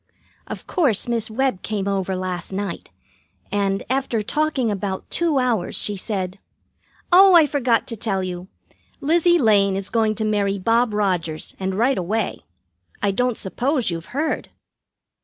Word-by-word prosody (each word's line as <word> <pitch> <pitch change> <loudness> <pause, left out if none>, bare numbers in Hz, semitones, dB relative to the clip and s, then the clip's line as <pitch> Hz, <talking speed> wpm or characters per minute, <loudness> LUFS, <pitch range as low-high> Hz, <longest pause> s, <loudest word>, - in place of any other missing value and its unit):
Of - - -7
course, 265 - +1
Miss 230 -2 -1
Webb 250 -3 0
came 205 -3 -3
over 195 -1 -1
last 185 -1 -4
night, 200 +1 -4 0.6
and, 195 -1 0
after 260 -4 -1
talking 270 -1 0
about 195 -1 -3
two 335 -4 +1
hours, 245 -8 0
she 205 - 0
said: 190 -1 -3 0.7
"Oh, 375 +1 +8
I 330 -3 +8
forgot 255 -5 +1
to 230 - -1
tell 200 -3 -1
you. 180 0 -5 0.5
Lizzie 345 +4 +3
Lane 205 - +3
is 195 0 -3
going 220 -2 +2
to 220 - -2
marry 200 -2 +1
Bob 230 +4 +2
Rogers, 175 -6 -1
and 190 0 -2
right 245 +4 +2
away. 205 +4 -2 0.6
I 200 - +3
don't 245 +3 0
suppose 245 - -1
you've 165 0 -5
heard." 305 +4 -2
215 Hz, 150 wpm, -22 LUFS, 195-255 Hz, 0.7 s, Oh